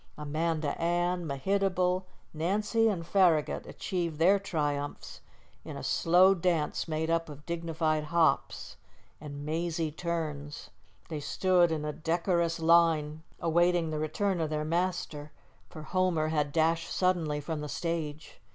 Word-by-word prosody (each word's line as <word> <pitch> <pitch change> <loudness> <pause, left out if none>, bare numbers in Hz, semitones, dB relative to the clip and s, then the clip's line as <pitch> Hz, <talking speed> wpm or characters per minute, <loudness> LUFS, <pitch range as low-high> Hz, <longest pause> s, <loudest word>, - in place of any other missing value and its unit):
Amanda 155 +1 -1
Ann, 175 0 0
Mehitable, 185 +4 0 0.3
Nancy, 210 +8 +1
and 180 -6 -1
Farragut 175 -4 +2
achieved 170 -5 -3
their 190 +5 +4
triumphs 145 -6 -3 0.4
in - - -7
a - - -7
slow 180 +3 +4
dance 170 -4 -1
made 160 +1 -1
up 165 -1 0
of 145 0 -11
dignified 160 -2 -1
hops 165 +1 0 0.4
and 145 -1 -7
mazy 160 0 -2
turns. 150 -3 -4 0.4
They 155 -2 -4
stood 175 +3 +2
in 155 -2 -2
a 150 - -3
decorous 170 +1 0
line 160 -2 +3 0.2
awaiting 170 0 +2
the 155 - -2
return 170 +4 -1
of 155 - -1
their 150 0 -2
master, 165 -3 -2 0.4
for 155 -3 -9
Homer 170 -3 0
had 150 -2 0
dashed 165 +1 +1
suddenly 170 -5 0
from 150 +1 -4
the 150 - -5
stage. 160 -6 -4
165 Hz, 135 wpm, -29 LUFS, 155-175 Hz, 0.4 s, their